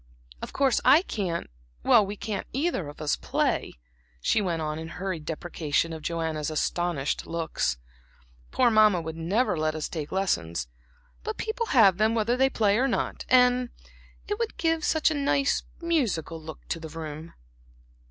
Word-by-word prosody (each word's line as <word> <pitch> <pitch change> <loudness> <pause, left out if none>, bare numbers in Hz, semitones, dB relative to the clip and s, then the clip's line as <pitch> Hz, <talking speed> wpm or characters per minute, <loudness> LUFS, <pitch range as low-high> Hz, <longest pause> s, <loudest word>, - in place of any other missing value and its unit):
Of - - -6
course 275 -2 +2
I 285 +7 +6
can't 185 - -3 0.4
we 205 0 +4
can't 210 0 -4
either 275 - -1
of 145 - -11
us 150 - +1
play," - - -1 0.5
she 135 - +2
went 175 -4 -1
on 155 0 -3
in 160 - -6
hurried 180 -2 -5
deprecation 165 -1 -1
of 160 - -7
Joanna's 160 -2 -2
astonished 155 -2 -1
looks, 160 - -1 0.7
"poor 245 -2 +3
Mamma 215 -4 +5
would 160 -1 -5
never 190 +6 +1
let 155 0 0
us 155 - -3
take 155 -3 -5
lessons; 85 - -1 0.6
but 440 0 -4
people 450 +1 -2
have 200 - +5
them 220 +1 +3
whether 230 +2 +1
they 265 +1 +3
play 210 -3 +2
or 265 - +3
not, 240 - -2
and 250 -1 +4 0.6
it 415 +1 -2
would 460 -2 -2
give 325 -1 +1
such 315 -1 +2
a - - +1
nice, 280 -1 +1 0.2
musical 220 - -1
look 160 0 -10
to 165 - -2
the 160 -1 -8
room." 160 0 -7
185 Hz, 160 wpm, -27 LUFS, 160-250 Hz, 0.7 s, I